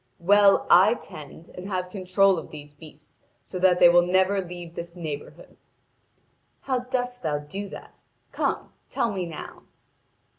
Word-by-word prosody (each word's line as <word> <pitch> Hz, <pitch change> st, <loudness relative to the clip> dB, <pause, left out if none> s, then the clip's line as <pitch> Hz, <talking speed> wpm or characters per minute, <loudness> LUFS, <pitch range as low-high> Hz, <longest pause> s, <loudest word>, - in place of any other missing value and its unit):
'Well, 200 Hz, +2 st, +4 dB
I 195 Hz, +6 st, +6 dB
tend 155 Hz, -4 st, -12 dB
and 180 Hz, +1 st, -9 dB
have 185 Hz, -2 st, -3 dB
control 190 Hz, -1 st, +2 dB
of -, -, -11 dB
these 145 Hz, -1 st, -11 dB
beasts 155 Hz, 0 st, -15 dB, 0.2 s
so 185 Hz, -, -7 dB
that 180 Hz, -1 st, +4 dB
they -, -, +8 dB
will 175 Hz, 0 st, +6 dB
never 190 Hz, +2 st, +2 dB
leave 175 Hz, -1 st, -9 dB
this 170 Hz, 0 st, -8 dB
neighbourhood.' 155 Hz, -5 st, -8 dB, 1.0 s
'How 260 Hz, -2 st, -1 dB
dost 245 Hz, 0 st, -3 dB
thou 150 Hz, -2 st, -1 dB
do 190 Hz, +8 st, -7 dB
that? -, -, -12 dB, 0.3 s
Come, -, -, -2 dB, 0.2 s
tell 230 Hz, -, -1 dB
me 185 Hz, -3 st, -3 dB
now!' 160 Hz, -, -9 dB
180 Hz, 150 wpm, -25 LUFS, 165-195 Hz, 1.0 s, they